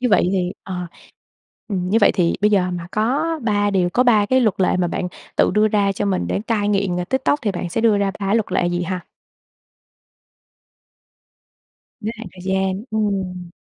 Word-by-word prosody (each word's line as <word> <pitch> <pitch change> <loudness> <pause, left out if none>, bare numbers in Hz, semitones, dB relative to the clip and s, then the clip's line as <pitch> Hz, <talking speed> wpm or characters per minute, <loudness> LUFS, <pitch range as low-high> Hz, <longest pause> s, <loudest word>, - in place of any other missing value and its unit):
như 250 - +1
vậy 200 -3 +3
thì 180 -1 0
ờ, 180 -2 -5 0.8
ừm, 180 -3 -2
như 220 +4 +3
vậy 205 - +5
thì 175 -3 +1
bây 210 +1 +3
giờ 185 -3 +2
mà 175 -1 -5
có 250 +9 +1 0.2
3 205 -2 +1
điều, 180 -3 +1
có 245 - +3
3 220 -5 +4
cái 260 +4 +3
luật 215 -5 +2
lệ 185 - +3
mà 180 -1 +1
bạn 180 +1 -2 0.3
tự - - +4
đưa 215 +1 +4
ra 200 -2 +2
cho 205 - -3
mình 190 -2 0
để - - -1
cai 210 -3 0
nghiện, 195 -3 +1
ờ, 180 - -1
TikTok 265 +6 +1
thì 210 - +1
bạn 175 -1 -4
sẽ 225 - -1
đưa 220 -3 +4
ra 200 -1 +1
3 200 +2 0
luật 220 -5 0
lệ 180 -1 +2
gì 175 0 -1
ha? 185 +1 -3 3.0
Giới 220 +2 -3
hạn 225 - -8
thời 180 -1 -12
gian, 190 +2 -1
ừm. 190 -5 -2
200 Hz, 200 wpm, -20 LUFS, 180-215 Hz, 3.0 s, vậy